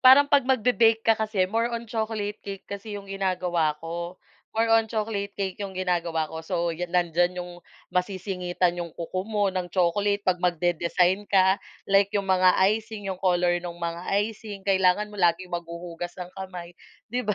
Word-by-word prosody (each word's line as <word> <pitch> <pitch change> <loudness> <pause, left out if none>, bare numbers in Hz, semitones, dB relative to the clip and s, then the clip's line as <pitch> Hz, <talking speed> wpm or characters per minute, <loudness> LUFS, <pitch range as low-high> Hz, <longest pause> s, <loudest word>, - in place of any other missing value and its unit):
parang 270 +2 +7
'pag 275 -3 +4
mag-be-bake 230 -3 +3
ka 225 - +6
kasi 215 -3 +1
more 230 +2 +1
on 235 0 -4
chocolate 220 -2 -3
cake 195 -1 -7
kasi 200 +1 -6
'yong 200 -1 -9
ginagawa 180 -5 0
ko, 170 +2 -5 0.4
more 225 0 +2
on 225 0 +5
chocolate 210 -2 -2
cake 195 -2 -3
'yong 195 -1 -5
ginagawa 170 -3 0
ko 160 - -5
so, 170 0 -1
nandiyan 175 +1 +1
'yong 175 -1 -7 0.3
masisingitan 180 -1 0
'yong 170 -2 -5
kuko 180 +2 -3
mo 205 -2 +1
ng 185 -1 -2
chocolate 200 +3 +1
'pag 185 -1 +2
magde-design 175 +3 +1
ka, 190 0 +4 0.2
like 195 0 +4
'yong 200 - 0
mga 185 -1 +4 0.2
icing, 215 -1 -5
'yong 185 -1 -6
color 175 -1 +2
ng 175 -1 -7
mga 170 0 -4 0.2
icing, 210 -2 -7
kailangan 195 +1 +3
mo 205 - -9
laging 180 +1 +2
maghuhugas 170 0 -5
ng 180 -1 -7
kamay, 180 -2 -7 0.4
'di 245 +2 0
ba? 210 - +1
185 Hz, 170 wpm, -26 LUFS, 175-205 Hz, 0.4 s, parang